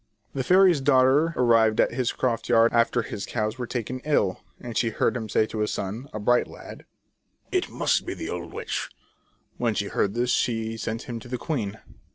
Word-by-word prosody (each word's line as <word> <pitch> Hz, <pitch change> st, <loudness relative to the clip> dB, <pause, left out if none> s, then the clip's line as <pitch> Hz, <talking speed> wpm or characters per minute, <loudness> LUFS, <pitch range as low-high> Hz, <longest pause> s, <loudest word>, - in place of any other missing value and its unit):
The 135 Hz, -, -2 dB
fairy's 180 Hz, -2 st, +5 dB
daughter 135 Hz, +4 st, +4 dB
arrived 115 Hz, -3 st, +4 dB
at -, -, +4 dB
his 125 Hz, -1 st, 0 dB
croft 115 Hz, -3 st, -2 dB
yard 115 Hz, -1 st, +5 dB
after 115 Hz, +1 st, +2 dB
the 100 Hz, -, -6 dB
cows 110 Hz, +1 st, -2 dB
were 120 Hz, -, -3 dB
taken 125 Hz, +1 st, -4 dB
ill, 125 Hz, -10 st, 0 dB, 0.2 s
and 120 Hz, -2 st, -8 dB
she 115 Hz, -, +2 dB
heard 110 Hz, -, 0 dB
him 110 Hz, -3 st, -4 dB
say 110 Hz, -, +2 dB
to 110 Hz, -, -6 dB
his 105 Hz, -, 0 dB
son, 110 Hz, +8 st, -4 dB
a 110 Hz, -, -5 dB
bright 120 Hz, +4 st, +2 dB
lad: -, -, -11 dB, 0.3 s
" -, -, -51 dB, 0.3 s
It -, -, 0 dB
must -, -, +1 dB
be -, -, -5 dB
the -, -, -6 dB
old -, -, -5 dB
witch -, -, -4 dB, 0.3 s
!" -, -, -41 dB
When 115 Hz, -3 st, +1 dB
she 100 Hz, 0 st, -2 dB
heard 100 Hz, +1 st, 0 dB
this, 120 Hz, +1 st, +1 dB
she 115 Hz, -2 st, 0 dB
sent 115 Hz, +1 st, -4 dB
him 120 Hz, -2 st, -6 dB
to 120 Hz, -, -12 dB
the 125 Hz, +1 st, -3 dB
queen. 115 Hz, -7 st, -3 dB
120 Hz, 210 wpm, -25 LUFS, 110-130 Hz, 0.3 s, fairy's